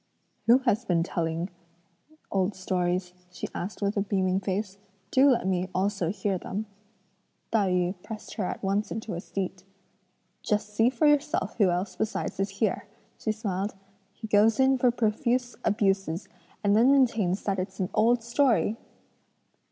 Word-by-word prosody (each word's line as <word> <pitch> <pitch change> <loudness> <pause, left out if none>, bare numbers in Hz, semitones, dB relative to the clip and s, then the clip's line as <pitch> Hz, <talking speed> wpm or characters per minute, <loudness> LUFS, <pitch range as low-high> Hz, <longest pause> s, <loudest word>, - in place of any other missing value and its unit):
"Who 235 +2 +8
has 235 -1 +2
been 175 -7 +1
telling 170 +1 -2 0.8
old 195 +1 +1
stories?" 180 -1 -1 0.2
she 180 - -6
asked 200 +3 -5
with 200 +1 0
a 200 - +1
beaming 190 -2 +1
face; 195 +1 -3 0.3
"do 270 +2 +6
let 240 -5 +2
me 185 0 0
also 190 -2 0
hear 190 0 -1
them." 205 +5 -4 0.9
Tai 205 -4 +2
yü 180 0 +1
pressed 215 +2 -8
her 205 - -2
at - - -4
once 200 +2 0
into 225 -2 -4
a 170 - -4
seat. 190 -1 -4 0.8
"Just 210 -1 -1
see 225 +3 +4
for 260 +4 0
yourself 295 +2 +2
who 200 -3 +5
else 180 +1 -1
besides 215 -3 -2
is 195 +1 0
here!" 200 0 -1 0.3
she 220 - 0
smiled; 205 -2 -3 0.4
"he 215 +3 -9
goes 215 +3 +4
in 265 0 +4
for 250 - +4
profuse 245 +2 0
abuses 195 -4 0 0.4
and 205 0 +4
then 240 +5 +6
maintains 225 -9 +2
that 195 -2 -1
it's 190 +1 -5
an 185 -1 -1
old 230 +2 +3
story!" 235 -2 +2
200 Hz, 160 wpm, -27 LUFS, 185-225 Hz, 0.9 s, Who